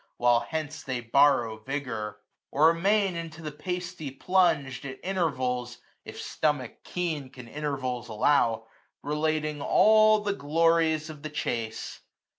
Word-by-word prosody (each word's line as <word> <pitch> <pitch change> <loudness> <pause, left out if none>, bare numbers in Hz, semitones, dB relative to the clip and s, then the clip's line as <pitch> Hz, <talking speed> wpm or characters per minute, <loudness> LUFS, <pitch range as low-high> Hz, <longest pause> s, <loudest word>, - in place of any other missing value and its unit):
While 120 -1 +4
hence 155 +5 -4
they 130 -2 -3
borrow 120 -2 +3
vigour: 110 -5 -4 0.3
or 155 +3 +5
amain 195 +2 +2
Into 165 -1 -7
the 155 - -4
pasty 180 0 -5
plung'd, 175 +1 +2 0.2
at 130 -1 -7
intervals, 130 -10 -1 0.3
If - - -9
stomach 145 -6 -2
keen 160 -7 -3
can 125 -2 -12
intervals 130 -3 -3
allow, 115 -1 +2 0.4
510 - - -6
Relating 155 -1 -1
all 215 +5 +5
the 205 -1 -1
glories 160 -1 +2
of 150 -2 -12
the 155 - -5
chase. 115 -7 -4
150 Hz, 130 wpm, -27 LUFS, 125-165 Hz, 0.4 s, or